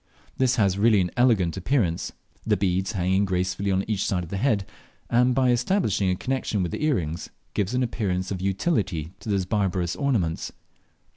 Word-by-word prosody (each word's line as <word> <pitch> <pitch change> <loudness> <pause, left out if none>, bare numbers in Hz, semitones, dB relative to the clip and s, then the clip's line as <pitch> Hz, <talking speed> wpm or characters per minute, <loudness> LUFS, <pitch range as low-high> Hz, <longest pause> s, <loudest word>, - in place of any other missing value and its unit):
This 130 -1 +2
has 100 -4 +2
really 110 -1 +5
an 90 -2 0
elegant 110 -9 +3
appearance, 95 -4 0 0.3
the - - +1
beads 95 +1 0
hanging 95 +1 +1
gracefully 95 +1 -1
on 95 0 +1
each 105 -3 0
side 90 -2 0
of 85 - -10
the 100 - -2
head, 105 -3 +1 0.5
and 125 +1 +4
by 130 -2 +3
establishing 120 - +1
a 90 - +1
connexion 120 -3 -1
with 85 - -3
the - - -4
earrings 85 - -1 0.2
give 100 -2 0
an 125 - +2
appearance 95 -6 -2
of 95 -2 -3
utility 95 - -1
to - - -8
those 100 -3 +1
barbarous 90 -3 0
ornaments. 110 - -1
100 Hz, 175 wpm, -25 LUFS, 90-120 Hz, 0.5 s, really